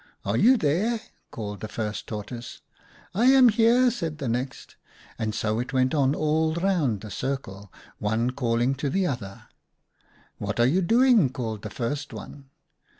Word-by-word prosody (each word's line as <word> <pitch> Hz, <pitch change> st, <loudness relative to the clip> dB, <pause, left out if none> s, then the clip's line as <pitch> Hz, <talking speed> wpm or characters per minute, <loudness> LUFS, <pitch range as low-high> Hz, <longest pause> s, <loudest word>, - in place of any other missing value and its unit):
" -, -, -37 dB
' -, -, -37 dB
Are -, -, 0 dB
you 255 Hz, +3 st, +5 dB
there? 205 Hz, +8 st, +1 dB, 0.2 s
' -, -, -44 dB
called 105 Hz, -3 st, -6 dB
the 110 Hz, -, -5 dB
first 105 Hz, -1 st, -4 dB
Tortoise. 115 Hz, +3 st, -7 dB, 0.2 s
" -, -, -28 dB
' -, -, -25 dB
I 225 Hz, +6 st, +2 dB
am 260 Hz, -1 st, +7 dB
here,' 235 Hz, +3 st, +4 dB
said 165 Hz, -10 st, -4 dB
the 140 Hz, -4 st, -4 dB
next, 125 Hz, +3 st, -4 dB, 0.4 s
and 110 Hz, -1 st, -2 dB
so 110 Hz, +1 st, -1 dB
it 125 Hz, +2 st, -4 dB
went 130 Hz, +2 st, +2 dB
on 140 Hz, -2 st, +2 dB
all 160 Hz, +1 st, +1 dB
round 170 Hz, -, 0 dB
the 110 Hz, -, -9 dB
circle, 100 Hz, -6 st, -5 dB, 0.3 s
one 110 Hz, +4 st, 0 dB
calling 120 Hz, 0 st, 0 dB
to 140 Hz, +1 st, -2 dB
the 190 Hz, +5 st, +1 dB
other. 120 Hz, -, -5 dB, 1.0 s
"'What 105 Hz, +3 st, -3 dB
are 120 Hz, -, +5 dB
you 165 Hz, +10 st, +2 dB
doing?' 230 Hz, -, +4 dB
called 115 Hz, -5 st, -5 dB
the 105 Hz, -, -6 dB
first 140 Hz, +7 st, -4 dB
one. 140 Hz, -2 st, -10 dB
135 Hz, 185 wpm, -25 LUFS, 110-175 Hz, 1.0 s, am